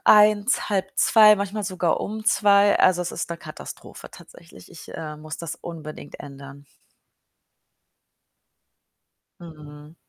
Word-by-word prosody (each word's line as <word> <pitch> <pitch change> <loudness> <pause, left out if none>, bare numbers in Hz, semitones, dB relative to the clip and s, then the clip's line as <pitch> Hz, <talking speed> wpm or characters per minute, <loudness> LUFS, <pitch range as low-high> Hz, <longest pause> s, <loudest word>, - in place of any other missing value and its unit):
1:00, 210 +2 +4
1:30, 210 +2 +4
manchmal 200 +1 -4
sogar 185 -3 -1
um 215 +1 -5
2:00. 205 -3 +4
Also, 180 -1 +3
es 180 - -5
ist - - -4
'ne 170 - -4
Katastrophe 155 -2 -11
tatsächlich. - - -16
Ich, - - -13
äh, 155 -1 -7
muss 155 +1 -8
das 170 -1 -7
unbedingt 155 -4 -10
ändern. 140 0 -12 2.8
Mhm. 150 -2 -13
175 Hz, 115 wpm, -23 LUFS, 155-205 Hz, 2.8 s, 1:00